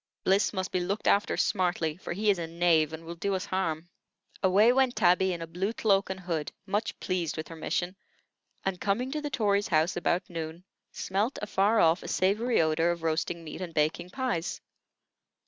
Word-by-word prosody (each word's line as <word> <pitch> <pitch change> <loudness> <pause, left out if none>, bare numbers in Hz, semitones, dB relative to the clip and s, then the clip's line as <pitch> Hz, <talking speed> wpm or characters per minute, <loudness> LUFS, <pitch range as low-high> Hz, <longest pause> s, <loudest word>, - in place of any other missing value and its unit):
Bliss 195 +2 +3
must 185 -2 -3
be 185 - +1
looked 195 +4 -2
after 200 - +3
smartly, 175 -5 +1
for 180 - -6
he 210 +3 +2
is 195 - -1
a 165 - -3
knave, 165 -2 +2
and 160 +1 -8
will 170 - -6
do 195 +3 -1
us 185 - -3
harm." 170 -3 -2 0.5
Away 205 +6 +5
went 260 -1 +2
Tabby 190 -1 +3
in 170 -2 -4
a - - -4
blue 180 +6 -2
cloak 200 -4 +2
and 190 0 -4
hood, 165 -4 -3
much 205 +3 -2
pleased 175 -4 -2
with 155 - -5
her 165 - -8
mission; 175 +3 -2 0.7
and, 190 -2 -2
coming 235 +6 0
to 305 +1 -2
the 295 - -3
Tory's 205 -6 +1
house 160 +1 +2
about 175 +1 0
noon, 165 0 -6 0.3
smelt 205 +7 -1
afar 210 +1 +2
off 165 +2 +4
a - - -8
savory 215 +6 +1
odor 160 +1 +2
of 170 -1 -2
roasting 165 +1 -1
meat 160 +3 -8
and 170 -3 -6
baking 160 +3 0
pies. 245 -8 -2
185 Hz, 195 wpm, -28 LUFS, 165-200 Hz, 0.7 s, Away